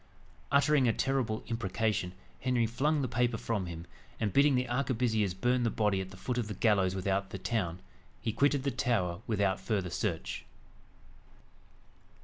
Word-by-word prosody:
Uttering 140 -1 +4
a 115 - +3
terrible 130 -5 0
imprecation, 105 -4 -1 0.3
Henry 125 -2 +1
flung 140 +6 +1
the - - 0
paper 120 -1 +1
from 105 -6 -2
him; 85 -1 -7 0.3
and 105 -4 -1
bidding 140 0 +5
the 125 0 +1
arquebusiers 120 -6 0
burn 120 +6 +1
the 120 - +2
body 105 -3 +1
at 95 - -6
the 95 - -12
foot 125 +5 -2
of 115 - -2
the 105 - -5
gallows 95 -3 +2
without 95 +1 -1
the 95 - -5
town, 95 -4 -1 0.4
he 115 -3 -2
quitted 140 +3 +2
the 140 - 0
tower 105 -8 0
without 100 -4 +1
further 95 -2 -1
search. - - -2
115 Hz, 160 wpm, -31 LUFS, 95-125 Hz, 0.4 s, bidding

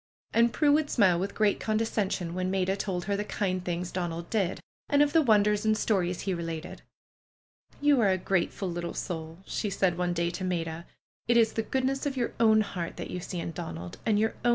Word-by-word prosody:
And 235 +1 +4
Prue 290 +6 +3
would 295 0 +3
smile 185 -7 +4
with 195 +2 -3
great 210 -2 +2
condescension 210 -5 -1
when 185 +1 -1
'Maida 190 0 +1
told 185 -3 -3
her 200 - 0
the 205 - -1
kind 185 -3 -2
things 175 0 -3
Donald 170 -2 -4
did, 195 -5 0 0.3
and 285 0 +5
of 290 - 0
the 325 - +6
wonders 210 -4 +3
and 215 0 +2
stories 180 -5 0
he 195 - -1
related. 165 -1 -5 1.0
^^You 290 -3 +5
are 210 -4 +4
a 185 - +2
grateful 190 +1 -1
little 170 0 -4
soull'^ 165 +1 -5
she 210 - -2
said 180 -2 +1
one 180 -1 +1
day 170 0 0
to 185 +2 -5
Maida. 170 -2 -3 0.4
^Ht 240 - +5
is 225 -2 +4
the 225 - 0
goodness 265 +4 -1
of 270 -2 -3
your 240 - -1
own 220 -1 +5
heart 180 -5 -4
that - - -6
you 180 - -3
see 175 0 -5
in 170 - -4
Donald, 85 - -7
and 215 -2 +2
your 220 +2 +1
own. 240 - +3
195 Hz, 215 wpm, -28 LUFS, 175-220 Hz, 1.0 s, the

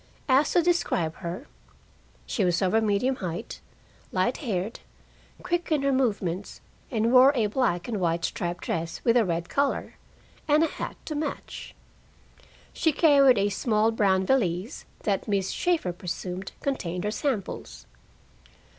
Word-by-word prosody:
Asked 275 +2 +3
to 350 - +5
describe 245 - 0
her 180 +9 -6 0.8
she 210 - -1
was 175 0 +2
over 190 +4 +3
medium 220 +5 +1
height, 180 0 -5 0.5
light 190 +7 +1
haired, 215 - -3 0.6
quick 350 -1 -1
in 300 -3 +2
her 275 - +2
movements, 205 -8 -1 0.3
and 225 -1 +1
wore 260 +2 +8
a 230 -4 +2
black 210 -5 0
and 225 -4 -2
white 170 -1 0
striped 175 0 -3
dress 165 0 -3
with 230 -1 +3
a 240 - +5
red 170 -3 -2
collar, 280 0 -1 0.5
and 305 +1 +4
a - - +3
hat - - -6
to 310 - -4
match. 300 -1 -5 1.0
She 320 - +2
carried 280 -5 +5
a 200 +1 +2
small 215 +2 +1
brown 190 -4 +2
valise 195 - 0 0.2
that 200 -2 -1
Miss 200 -2 0
Shaeffer 335 - 0
presumed 180 +1 -5
contained 180 -10 -2
her 210 - -1
samples. 205 - -3
215 Hz, 145 wpm, -26 LUFS, 180-270 Hz, 1.0 s, wore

